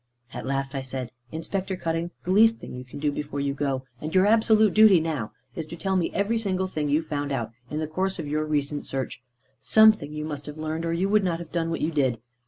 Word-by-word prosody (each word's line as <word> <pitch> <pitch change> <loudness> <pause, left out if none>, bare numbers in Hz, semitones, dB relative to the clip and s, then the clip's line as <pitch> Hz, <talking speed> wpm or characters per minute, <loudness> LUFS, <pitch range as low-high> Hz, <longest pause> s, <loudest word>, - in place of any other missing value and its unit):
At - - -5
last 135 0 -1
I 135 - -2
said 130 -2 -5 0.2
"Inspector 185 +4 -3
Cutting, 165 0 -2
the 180 - -2
least 225 +3 +6
thing - - -9
you 125 0 -6
can 125 - -11
do 145 0 0
before 145 0 -4
you 140 0 0
go, 135 -2 -1 0.2
and 155 +4 -4
your 185 +1 +6
absolute 220 -1 +4
duty 215 -4 +7
now, 155 -9 -2 0.2
is 160 -2 -4
to 170 - -7
tell 190 +3 -1
me 180 -3 +1
every 210 +3 0
single 190 -3 -1
thing 155 -5 -2
you 150 +3 +2
found 145 -2 -3
out, 115 -5 -2 0.2
in 150 - -3
the 155 - -1
course 185 +5 -2
of 160 -4 -5
your 155 +1 0
recent 145 -1 -1
search. 135 -2 -3 0.4
Something 215 -9 +5
you 150 0 -4
must 145 -2 -6
have 150 +1 -7
learned, 155 +1 -3
or 165 - 0
you 180 +3 +1
would 210 0 +3
not 175 -3 0
have 165 -2 -9
done 165 -1 -1
what 165 - -2
you 160 - +1
did. 135 -6 +1
155 Hz, 245 wpm, -26 LUFS, 145-185 Hz, 0.4 s, duty